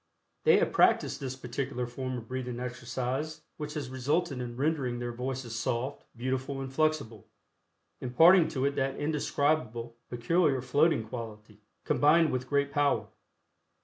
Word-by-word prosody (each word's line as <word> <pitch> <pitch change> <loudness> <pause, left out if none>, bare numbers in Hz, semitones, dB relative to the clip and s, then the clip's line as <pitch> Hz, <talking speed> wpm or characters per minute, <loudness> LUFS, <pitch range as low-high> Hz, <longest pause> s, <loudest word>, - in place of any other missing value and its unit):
They - - +7
have - - +2
practiced - - +3
this 130 -1 -4
particular 130 0 -3
form 130 +1 -4
of 115 -2 -8
breathing 125 -1 -4
exercise 125 +4 -3 0.2
which 150 -1 -5
has 140 -4 -4
resulted 140 +2 0
in 120 -1 -6
rendering 135 -4 0
their 120 0 -3
voices 125 -1 -4
soft, 120 +4 -2
beautiful 130 +2 -2
and 135 0 -6
flexible, 145 -8 0 0.7
imparting 165 +8 +6
to 130 -1 -1
it 140 0 0
that 135 0 0
indescribable, 145 -5 -1
peculiar 135 +4 +2
floating 140 -2 +2
quality, 110 -3 -8 0.2
combined 155 +2 +4
with 130 0 -3
great 140 0 +1
power. 140 -8 +1
130 Hz, 140 wpm, -30 LUFS, 120-145 Hz, 0.7 s, They